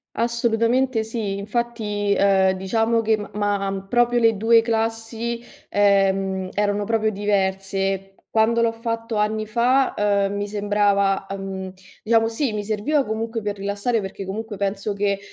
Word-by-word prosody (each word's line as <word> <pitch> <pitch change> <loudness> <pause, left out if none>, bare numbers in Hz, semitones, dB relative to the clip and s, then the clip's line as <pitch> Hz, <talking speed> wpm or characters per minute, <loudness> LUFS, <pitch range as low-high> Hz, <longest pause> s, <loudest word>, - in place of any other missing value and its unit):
Assolutamente 235 +1 +1
sì. 220 -3 -3
Infatti, 210 -2 -2
ehm, 190 -1 +4
diciamo 225 +4 +1
che, 220 0 +2
m 205 - -8
m'ha 200 -2 -1
proprio 240 +1 +3
le 225 -2 +3
2 225 +2 +5
classi, 225 +1 -2 0.3
ehm, 195 -2 +2
erano 205 0 0
proprio 220 0 +1
diverse. 195 -1 -1
Quando 225 +1 +2
l'ho 230 -1 +2
fatto 230 0 -4
anni 215 +1 0
fa, 245 +4 +2
uhm, 200 -1 +1
mi 205 0 -2
sembrava, 200 -1 +1
uhm, 190 -1 -5 0.3
diciamo 225 0 +3
sì, 230 +1 -1
mi 210 -1 -3
serviva 260 +8 0
comunque 225 +1 -3
per 205 -1 -3
rilassare, 200 +4 -1
perché 195 0 -6
comunque 215 +2 -5
penso 200 +1 -2
che, 200 -1 0
210 Hz, 140 wpm, -22 LUFS, 200-230 Hz, 0.3 s, 2